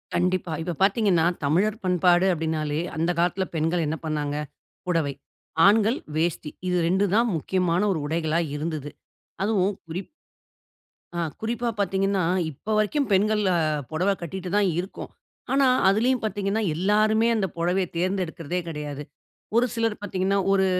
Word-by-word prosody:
கண்டிப்பா. 180 -1 0
இப்ப 170 +1 -3
பாத்தீங்கன்னா 195 -4 +3 0.2
தமிழர் 195 +9 +2
பண்பாடு 180 0 +4
அப்படீன்னாலே, 155 -2 -1 0.2
அந்த 165 +2 +1
காலத்துல 180 +2 +1
பெண்கள் 165 +1 +1
என்ன 155 +2 -2
பண்ணாங்க? 150 -2 -2 0.5
புடவை, 165 -5 +1 0.5
ஆண்கள் 220 +4 +4 0.2
வேஷ்டி. 160 -2 -1 0.2
இது 180 0 +1
2 190 +3 +2
தான் 235 +2 +3
முக்கியமான 180 +2 0
ஒரு 175 - -1
உடைகளா 160 +1 0 0.2
இருந்துது. 150 -1 -3 0.5
அதுவும் 200 -1 +1
குறிப் 175 +4 -5 1.1
ஆ - - 0 0.2
குறிப்பா 235 +2 -1
பாத்தீங்கன்னா, 195 0 +1 0.3
இப்ப 210 +10 -4
வரைக்கும் 255 +7 +1
பெண்கள் 210 +2 +3
அ - - +3 0.3
பொடவை 180 +6 +1
கட்டிட்டு 180 +2 -5
தான் 200 -2 +3
இருக்கோம். 185 +2 -6 0.4
ஆனா 275 0 +4 0.2
அதுலயும் 235 +6 +3
பாத்தீங்கன்னா, 205 0 -1
எல்லாருமே 215 +5 +3
அந்த 205 -3 +1
பொடவைய 180 +3 +1
தேர்ந்தெடுக்கறதே 180 -2 -2
கெடையாது. 150 -2 -5 0.5
ஒரு 240 +1 +4
சிலர் 225 -2 0
பாத்தீங்கன்னா, 195 -1 0
ஒரு 190 -1 +3
185 Hz, 135 wpm, -25 LUFS, 165-205 Hz, 1.1 s, பண்பாடு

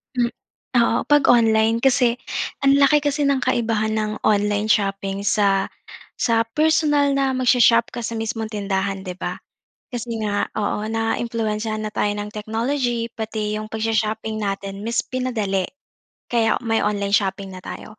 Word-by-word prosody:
M 240 -1 +2 0.5
oo, 230 0 +2
'pag 290 -1 +5
online 225 -1 +4
kasi, 245 -3 +4 0.5
ang 275 0 +5
laki 285 +1 +5
kasi 290 0 0
ng 275 -1 +2
kaibahan 225 -2 0
ng 215 -1 -1
online 210 0 +1
shopping 195 0 -1
sa 200 -2 +2 0.5
sa 230 -1 +2
personal 300 -2 +3
na 270 -1 +1
mag-sho-shop 240 -2 +4
ka 240 - -4
sa 230 - -4
mismong 225 0 -3
tindahan 195 -2 -2
'di 180 -2 -6
ba. - - -3 0.5
Kasi 235 -1 -4
nga, 205 -1 0
oo, 205 -1 -1
na-impluwensyahan 225 -1 -2
na 215 - -4
tayo 210 - 0
ng 205 0 -4
technology, 230 +3 -1
pati 215 -2 -3
'yung 215 0 -5
pag-sho-shopping 220 0 -1
natin, 195 0 -4
mas 235 +1 0
pinadali. 220 -7 -1 0.7
Kaya 230 -2 +3
may 225 -1 +1
online 200 -1 -1
shopping 195 -1 0
na 185 - -9
tayo. 215 +2 -9
220 Hz, 145 wpm, -22 LUFS, 210-240 Hz, 0.7 s, pag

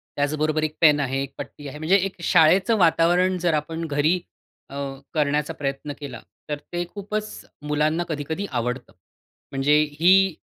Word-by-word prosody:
त्याचबरोबर 155 +2 0
एक 155 0 -2
पेन 150 -3 +6
आहे, 135 -1 -1
एक 135 0 -8
पट्टी 145 - -8
आहे. 140 - -8
म्हणजे 160 +5 +3
एक 185 -2 -7
शाळेचं 180 +7 +4
वातावरण 175 +1 +3
जर 170 -1 +1
आपण 160 +2 -2
घरी 150 +4 +2 0.5
अ, 140 - -9 0.4
करण्याचा 150 +1 0
प्रयत्न 145 -1 -4
केला, 135 -5 -7 0.3
तर 150 - -1 0.2
ते 175 0 0
खूपच 210 +1 -5 0.2
मुलांना 150 +3 0
कधी-कधी 160 +5 -3
आवडतं. 125 0 -3 0.6
म्हणजे 135 +2 +2 0.3
ही 190 +2 +5
155 Hz, 150 wpm, -23 LUFS, 145-175 Hz, 0.6 s, पेन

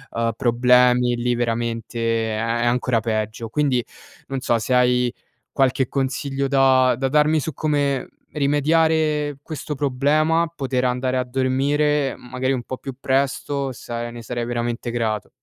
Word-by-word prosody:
ehm, 115 0 +1
problemi, 125 +1 +3
lì 120 0 0
veramente 115 -1 -1
è 115 +1 -1
è - - +1
ancora 120 -1 +1
peggio. 110 0 -3
Quindi 130 -1 +1 0.5
non 135 -1 -2
so 120 -3 +1
se 130 - -1
hai 125 0 +3 0.4
qualche 130 -1 +1
consiglio 135 0 -1
da 130 -2 +4
da 135 +1 -1
darmi 150 +2 +3
su 160 +1 -4
come 145 -3 0 0.2
rimediare 150 0 +1
questo 155 -2 -5
problema, 150 +4 +2
poter 130 -3 -1
andare 125 +1 0
a 125 - +1
dormire 135 +2 +1
magari 130 +1 -2
un 125 -2 -3
po' 130 - -6
più 135 -1 -8
presto, 135 +1 -1
sar 120 0 -6
ne 120 0 -9
sarei 120 0 -3
veramente 120 0 -3
grato. 110 -3 -2
130 Hz, 145 wpm, -22 LUFS, 120-140 Hz, 0.5 s, da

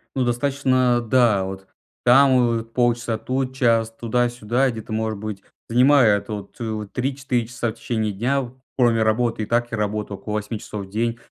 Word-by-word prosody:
Ну, 130 - +1
достаточно, 130 0 +1
да. 115 -4 +3
Вот 95 0 -7 0.4
там, 125 -2 +5
вот, 115 0 -8
полчаса, 120 -2 +1
тут 130 +2 -3
час, 115 -3 +2
туда-сюда, 120 +2 0
где-то 110 -1 -8
может 110 -1 -2
быть. 105 -2 -6 0.3
Занимает 120 -4 +4
вот, 105 -3 -7
э, 110 -2 -4
3, 130 +2 -2
4 125 -4 -1
часа 120 0 -3
в - - -5
течение 110 -3 -2
дня, 125 +8 0
вот, 125 0 -9 0.2
кроме 120 -3 +3
работы. 110 +1 +1
И - - -3
так 120 +2 0
я 120 - -2
работаю 105 -1 -2
около 105 - -6
8 105 +1 -3
часов 105 -1 -6
в - - -17
день, 115 +3 -1
115 Hz, 180 wpm, -22 LUFS, 110-125 Hz, 0.4 s, там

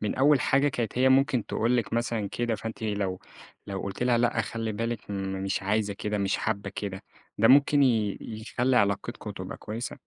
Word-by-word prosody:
من 105 - -1
أول 140 +1 +4
حاجة 140 +2 +3
كانت 120 -2 -3
هي 130 +1 +5
ممكن 130 -3 +3
تقول 120 +2 +1
لِك 115 - -2
مثلًا 115 -3 -1
كده 120 -1 -1
فأنتِ 115 +3 -6
لو 100 -3 -1 0.5
لو 95 -1 -4
قُلتِ 100 +4 -4
لها 120 -1 +3
لأ، 120 -1 +2
خلّي 115 0 -4
بالِك 115 +2 -2
أنا 95 -1 -3
م - - -5
مش 95 - -1
عايزة 105 +1 0
كده، 105 +1 -3
مش 100 -1 +1
حابّة 100 -2 -2
كده، 100 -2 -5 0.4
ده 115 +2 +5
ممكن 140 +1 +6
ي 110 -6 +2
يخلّي 120 +3 -1
علاقتكم 100 -3 0
تبقى - - -7
كويسة؟ 115 +3 -6
110 Hz, 195 wpm, -27 LUFS, 100-125 Hz, 0.5 s, ممكن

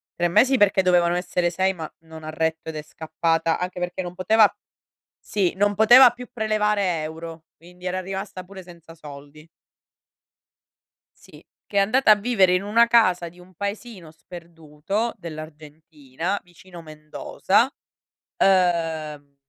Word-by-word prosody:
3 175 0 0
mesi 260 +10 +4
perché 205 -5 +3
dovevano 175 -1 +2
essere 180 -1 -1
6 190 +2 0
ma 165 -4 -8
non 160 -1 -12
ha 155 - -7
retto 160 +1 -3
ed 160 - -6
è - - -4
scappata, 165 +1 -2
anche 180 0 -5
perché 180 +1 -3
non 180 -1 -7
poteva 210 +4 +4 0.7
sì, 195 -4 -1
non 205 +1 +1
poteva 245 +5 +8
più 245 +1 -11
prelevare 210 -6 0
euro, 160 +1 -8
quindi 180 +2 -16
era 185 0 -2
rimasta 190 0 -6
pure 190 0 -12
senza 170 -2 -15
soldi. 145 0 -13 1.8
Sì, - - -17 0.2
che 200 - -5
è - - +6
andata 220 +4 +3
a - - +8
vivere 205 -4 +2
in 180 - 0
una 230 +3 +3
casa 185 -7 +2
di 175 +2 -20
un 180 +1 -18
paesino 200 -3 -7
sperduto 170 +5 -6
dell'Argentina, 155 0 -7
vicino 175 0 -15
Mendoza, 155 - -1 0.7
uhm, 160 -6 0
180 Hz, 140 wpm, -23 LUFS, 160-200 Hz, 1.8 s, poteva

